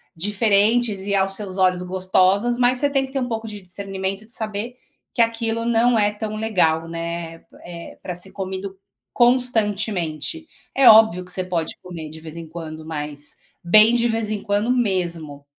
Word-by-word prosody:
diferentes 205 +2 +2
e 200 0 0
aos 195 0 +2
seus 195 -2 -5
olhos 185 -1 +3
gostosas, 185 +5 +2
mas 250 0 +3
você 285 +3 +1
tem 275 -1 +1
que 265 - -13
ter 270 - -1
um 250 - -2
pouco 225 -1 -4
de 210 -1 -7
discernimento, 195 +2 -5
de 230 - -11
saber 220 +3 -4 0.4
que 235 - +2
aquilo 230 0 -2
não 235 0 +3
é 205 -1 +3
tão 215 0 -5
legal, 170 -7 +1
né, 165 0 -5 0.2
eh, 170 -1 -9
pra 180 - -5
ser 180 +2 -3
comido 190 0 -5 0.3
constantemente. 220 - 0 0.3
É 270 -2 +5
óbvio 215 -5 +6
que 180 - -7
você 185 +1 -2
pode 175 -3 -2
comer 165 -4 -8
de 160 +1 -11
vez 160 +1 -10
em 165 -1 -7
quando, 160 -1 -8
mas, 150 -2 -4 0.3
bem 215 +6 +6
de 240 0 +2
vez 225 -2 -1
em 210 - -2
quando, 205 +4 0
mesmo. 170 - -1
200 Hz, 175 wpm, -22 LUFS, 175-225 Hz, 0.4 s, óbvio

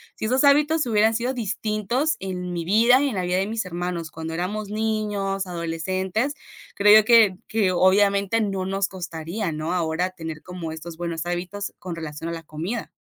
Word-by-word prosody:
si - - -4
esos 255 +5 +2
hábitos 295 +1 +4
hubieran 220 0 +3
sido 245 +3 -1
distintos 220 +6 -1
en 180 -2 -4
mi 170 -1 -3
vida 235 +7 +5
y 280 - +2
en 220 - -4
la 185 - 0
vida 180 +1 0
de 195 +2 0
mis 220 -2 -2
hermanos 175 -2 -4
cuando 160 0 -6
éramos 200 +4 -3
niños, 210 -3 -1
adolescentes, 185 - -2 0.4
creo 210 +1 +8
yo 215 - 0
que 225 -5 +6
que, 210 -4 +1
obviamente, 200 +2 +3
no 195 -3 -1
nos 195 +1 0
costaría, 175 +1 -4
¿no? 155 +2 -3
Ahora 175 +1 0
tener 160 -4 -7
como 180 -3 -6
estos 160 +1 -8
buenos 170 -1 -3
hábitos 180 +3 -3
con 180 -2 -6
relación 160 0 -6
a - - -3
la 165 -1 -7
comida. 170 +10 -5
190 Hz, 185 wpm, -24 LUFS, 170-215 Hz, 0.4 s, creo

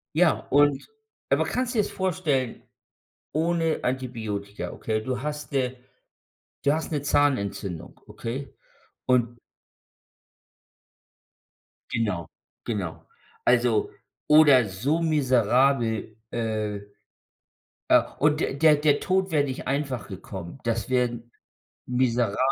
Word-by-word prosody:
Ja, 170 0 +4
und 145 -1 +3 0.4
aber - - +3
kannst 255 0 -2
dir's 215 -3 +1
vorstellen, 160 -10 -1 0.7
ohne 165 +1 +1
Antibiotika? 110 -6 -3
Okay. 110 -1 -2
Du 125 +2 -3
hast, 150 +1 -5
äh 130 -2 0 0.9
du 140 - +4
hast 160 +1 -2
'ne 145 -2 -1
Zahnentzündung, 100 - 0
okay? 130 +4 -6 0.5
Und 120 -2 +1 2.5
Genau, 105 -8 -1 0.4
genau. 95 -8 -4 0.4
Also, 120 -3 +3 0.4
oder 145 -6 +6
so 130 - -1
miserabel, 130 -6 +2
äh, 110 -3 -2 1.1
äh - - +7 0.2
und 150 +1 +3
der - - -1
der 155 +1 +6
der 145 -1 +3
Tod 190 -1 0
wäre 150 -2 +3
nicht 135 -2 -5
einfach 135 -6 -2
gekommen. 95 0 -8
Das 115 -1 -1
wären 120 -2 -1 0.5
miserabel 120 -4 +1
130 Hz, 100 wpm, -26 LUFS, 115-150 Hz, 2.5 s, äh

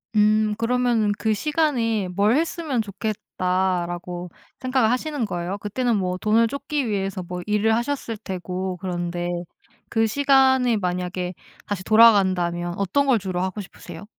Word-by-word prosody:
음. 215 0 +3
그러면은 230 -2 +1
'그 220 -1 +1
시간에 235 - 0
뭘 200 +5 +2
했으면 315 -5 0
좋겠다.' 185 -3 -1
라고 175 0 -6 0.3
생각을 255 -3 +2
하시는 280 0 -1
거예요? 180 0 -3
그때는 235 +3 -1
뭐 185 -1 -1
돈을 220 +3 +3
쫓기 280 -1 -2
위해서 195 -2 -2
뭐 180 +1 -6
일을 210 +1 +2
하셨을 235 -2 -2
테고 185 -2 -4
그런데 175 -1 -3 0.6
그 225 -1 +2
시간에 265 -1 +4
만약에 180 -1 -2 0.3
다시 200 -3 -4
돌아간다면 185 -6 +4
어떤 200 +9 +1
걸 255 -4 +4
주로 185 -2 -3
하고 190 +3 -3
싶으세요? 200 +2 -11
210 Hz, 315 characters per minute, -23 LUFS, 185-240 Hz, 0.6 s, 시간에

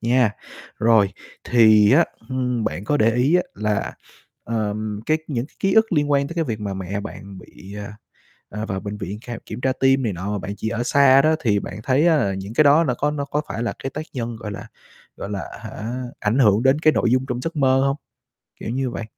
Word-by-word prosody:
nha. 120 -1 +3 0.5
Rồi, 110 -3 +4 0.3
thì 110 -2 +5
á, 170 +4 +6 0.2
ưm, 125 -3 -1
bạn 100 - -3
có 145 - +1
để 115 -3 +3
ý 135 +7 +2
á 180 - +2
là, 105 0 -1 0.5
ờm, 105 -1 -3
cái 155 0 +2
những 125 -2 -2
cái - - -30
ký 195 - +1
ức 220 -3 +4
liên 145 -2 +1
quan 140 0 +2
tới 170 - -7
cái 165 - 0
việc 110 -6 -4
mà 100 -2 -3
mẹ 95 +2 -4
bạn 100 -2 -9
bị, 95 +2 -13
à, 105 +1 -8 0.5
à, 105 +1 -5
vào 95 -3 -3
bệnh 105 +1 -6
viện 100 +1 -6
khám 120 -2 -6
kiểm - - -7
tra 130 0 +1
tim 135 0 +3
này 105 -4 -1
nọ 95 +4 -4
mà 105 - -1
bạn 100 +2 -5
chỉ 110 - -3
ở 115 +1 -2
xa 135 +1 +5
đó, 155 +1 +3
thì 105 -6 +1
bạn 95 +2 -7
thấy 140 +7 +3
á 160 -2 +4
là 100 -7 0
những 95 +3 -6
cái 155 - +4
đó 150 +3 +5
nó 130 -6 0
có 145 +1 0
nó 145 -1 -3
có 150 +1 -1
phải 115 - -3
là 120 - -2
cái 135 - -2
tác 155 +3 -6
nhân, 120 -3 -4
gọi 110 -2 -7
là 105 +3 -8 0.5
gọi 100 - -6
là, 100 -6 -3 0.2
hả, 120 +4 -6 0.2
ảnh 110 +6 0
hưởng 105 -2 +4
đến 135 +2 +4
cái 155 -1 +4
nội 115 - +1
dung 130 +1 +2
trong 125 0 -2
giấc 165 +4 -4
mơ 130 -2 +3
hông? 135 - 0 0.6
Kiểu - - -5
như 130 +2 -1
vậy. 115 - -5
120 Hz, 245 wpm, -22 LUFS, 105-140 Hz, 0.6 s, á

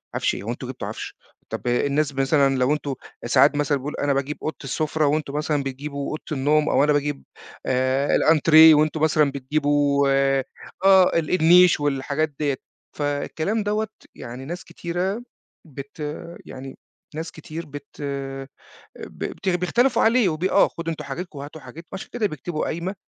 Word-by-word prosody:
عفش - - 0
إيه - - -7
هو 110 - -6
أنتم 125 +1 -6
جِبتوا 130 - -6
عفش، - - -7 0.3
طَب - - -5
الناس 140 +4 +1
مثلًا 135 0 +2
لو 130 +2 +2
أنتم 150 -2 -3 0.3
ساعات 135 +4 +4
مثلًا 145 0 +1
بيقول 140 +3 -6
أنا 145 -1 0
باجيب 135 +2 -2
أوضة 155 - -2
السُفرة، 155 +2 -1
وأنتم 145 -1 0
مثلًا 150 -1 -1
بتجيبوا 140 +1 -5
أوضة 155 - -5
النوم، 150 +2 +2
أو - - +3
أنا 150 0 +3
باجيب 145 -1 -1 0.4
آآ، 130 +2 +1
الأنتريه 160 0 +7
وأنتم 155 +1 +1
مثلًا 155 -2 +3
بتجيبوا 140 +1 +1 0.8
آه 190 -1 +6
ال 155 - -4
النيش 175 +1 +6
والحاجات 145 +2 -1
ديَّة، 145 -3 0 0.4
فالكلام 155 +8 -1
دوَّة 210 +1 -1 0.3
يعني 125 +2 -8
ناس 175 +5 -6
كتيرة 185 +6 -3 0.4
بت 140 +1 -10 0.5
يعني 130 0 -9 0.4
ناس 160 +2 -5
كتير 160 +1 -8
بت 145 0 -11 0.9
بت 195 - -7
بت - - +5
بيختلفوا 230 +8 +2
عليه 230 -3 +4
وب 155 +1 -4
آه 190 +1 +4
خدوا 165 0 -5
أنتم 160 - -6
حاجتكم 175 -4 -6
وهاتوا 145 +2 -9
حاجت 165 +2 -11
وعشان 190 - -7
كده 230 -3 0
بيكتبوا 155 -1 -4
قايمة 170 +5 -3
150 Hz, 160 wpm, -23 LUFS, 140-165 Hz, 0.9 s, الأنتريه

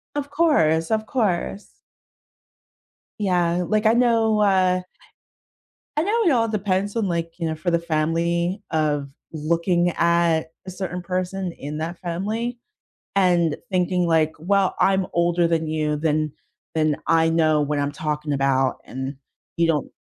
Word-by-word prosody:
Of 285 -1 -3
course, 165 - +2
of 220 0 0
course. 205 -4 -1 1.5
Yeah, 180 -3 +1
like, 215 0 +1
I 220 - +5
know, 230 -3 +3
uh 185 -2 +3 1.1
I 305 - +2
know 435 +7 +1
it 335 - +5
all 230 -3 +2
depends 200 0 -1
on, 220 -3 0
like, 170 -1 -2
you 170 -2 -2
know, 160 - -2
for 165 +3 -2
the 170 -1 +2
family 170 +4 -1
of 150 -3 0 0.2
looking 170 +3 +1
at 170 -1 +2 0.2
a 185 - -6
certain 180 -1 -4
person 185 0 -2
in 150 -2 -7
that 170 +2 -4
family, 210 +8 -3 0.6
and 175 -5 +3
thinking, 180 -1 +1
like, 160 -1 +2
"Well, 190 +3 +1
I'm 190 -1 +3
older 170 0 +2
than 165 -1 0
you, 155 -1 -1
then 155 -1 0 0.4
then 155 -2 +1
I 165 0 +4
know 155 -2 +3
what 145 0 -1
I'm 145 0 -1
talking 150 0 -3
about, 135 -1 +1
and 130 +2 -5 0.4
you 170 - +3
don't 155 -4 0
170 Hz, 145 wpm, -23 LUFS, 155-195 Hz, 1.5 s, I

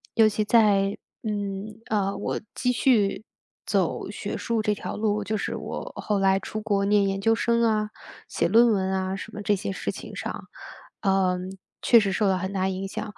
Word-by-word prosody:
尤 225 -2 +6
其 215 0 0
在， 205 -3 +4 0.3
嗯， 205 0 -4
啊， 200 -2 0
我 - - -3
继 250 - +1
续 225 -5 +2 0.4
走 - - 0
学 - - -5
术 230 -2 -1
这 210 -1 +1
条 - - -5
路， 210 -1 0
就 215 +1 -1
是 - - -3
我 - - -6
后 210 -2 -1
来 195 0 +3
出 215 +3 -5
国 205 -2 +1
念 200 0 +3
研 195 0 -2
究 225 +3 +4
生 235 +1 +1
啊， 215 -2 +2 0.4
写 - - 0
论 230 +5 +6
文 190 -2 +1
啊 190 0 -1
什 200 +3 -7
么 210 - -6
这 205 0 +2
些 195 0 -4
事 190 - -3
情 - - -9
上， - - -5 0.5
呃， 190 -2 +2 0.5
确 235 - +7
实 200 -2 0
受 200 +1 +1
到 190 - +3
很 190 +1 -3
大 190 -1 0
影 190 +1 -3
响。 205 +2 -6
205 Hz, 210 characters per minute, -25 LUFS, 195-215 Hz, 0.5 s, 确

